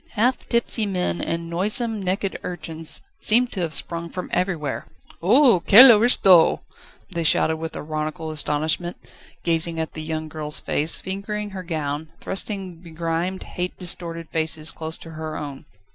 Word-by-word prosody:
Half 245 +4 0
tipsy 235 -2 +1
men 180 - -1
and 170 0 -3
noisome, 210 +6 +1
naked 190 +1 -2
urchins 165 -3 -1 0.2
seemed 240 +3 +4
to 195 - -6
have 165 -2 -2
sprung 170 +1 -1
from 180 +1 -7
everywhere. 170 -6 -2 0.3
"Oho, 235 - +5
quelle 230 +9 +9
aristo!" 195 -6 +5 0.5
they 170 -2 -2
shouted 160 0 +3
with 160 0 -6
ironical 155 +1 -4
astonishment, 155 +3 -2 0.5
gazing 165 0 0
at 160 - -4
the 155 - -6
young 155 0 -4
girl's 150 -1 -2
face, 155 +2 -1
fingering 205 +2 -5
her 190 -1 -6
gown, 155 -3 -4
thrusting 190 -3 -3
begrimed, 170 +2 -4
hate 180 0 -5
distorted 170 -2 -3
faces 160 -1 0
close 160 0 -1
to 165 - -12
her 155 -1 -6
own. 140 -2 -8
170 Hz, 145 wpm, -22 LUFS, 160-195 Hz, 0.5 s, quelle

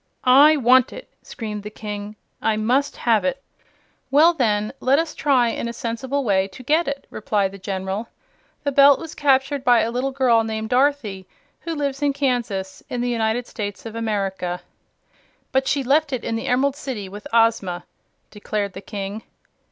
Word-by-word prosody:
"I 285 +5 +7
want 255 -1 +4
it!" - - -10
screamed 215 -4 -6
the 210 - -7
King. 210 -1 -7 0.3
"I 220 -1 +1
must 255 +6 +1
have 225 -3 +2
it." 275 0 -2 0.7
"Well, 310 +6 +6
then, 215 -6 0
let 265 +2 +3
us 325 0 -1
try 260 -5 +2
in 235 - -3
a 235 - -4
sensible 250 +5 -3
way 195 -4 +2
to 195 +6 -13
get 310 +6 +2
it," 280 0 -4
replied 205 -2 -1
the 195 - -11
General. 190 +3 -4 0.6
"The 285 - 0
Belt 280 0 +6
was 325 -1 -8
captured 270 -1 +1
by 240 -3 +5
a 230 - -1
little 250 +3 -1
girl 255 -4 +3
named 220 0 -4
Dorothy, 245 -8 +1 0.3
who 335 -1 -5
lives 280 -1 -2
in 285 -1 +2
Kansas, 240 -9 -2
in 245 - -3
the 245 - -1
United 225 +1 0
States 205 -3 -6
of 225 - -6
America." 195 -5 -2 0.9
"But 265 0 +1
she 280 -1 +1
left 285 +3 +2
it 255 - -3
in 225 - -2
the 225 - -4
Emerald 265 +2 +2
City, 255 -9 -5
with 205 +2 -9
Ozma," 225 -6 +2 0.5
declared 205 -1 -3
the 190 - -8
King. 200 +1 -6
235 Hz, 175 wpm, -22 LUFS, 210-275 Hz, 0.9 s, I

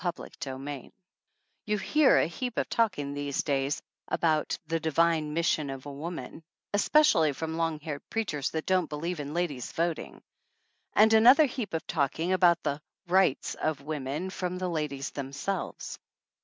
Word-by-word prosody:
CHAPTER 175 -2 -3 0.2
II 135 0 -6 0.8
YOU 210 0 +1
hear 300 +7 +4
a - - +4
heap 245 - -4
of - - 0
talking 185 -12 0
these 145 -1 -2
days 140 0 0 0.2
about 155 -2 +1
"the 165 +1 -1
divine 160 -1 +1
mission 160 -3 +1
of 135 0 -6
woman," 155 +4 -6 0.3
especially 205 - +4
from 160 +3 -4
long 165 -2 -1
haired 150 -2 -5
preachers 155 -11 -1
that 160 -1 -3
don't 185 -3 +2
believe 165 +3 -3
in 145 +2 -5
ladies 150 -8 -2
voting; 170 0 -2 0.7
and 220 +1 +6
another 250 +8 +8
heap 240 - -4
of 160 0 -3
talk 140 -5 0
about 175 0 +3
the 145 +1 -2 0.3
"rights" 180 -5 +2
of 155 -3 -2
women 150 +4 -3
from 180 -1 -3
the 185 0 -2
ladies 150 -4 -3
themselves. 140 +8 -4
160 Hz, 150 wpm, -29 LUFS, 145-185 Hz, 0.8 s, another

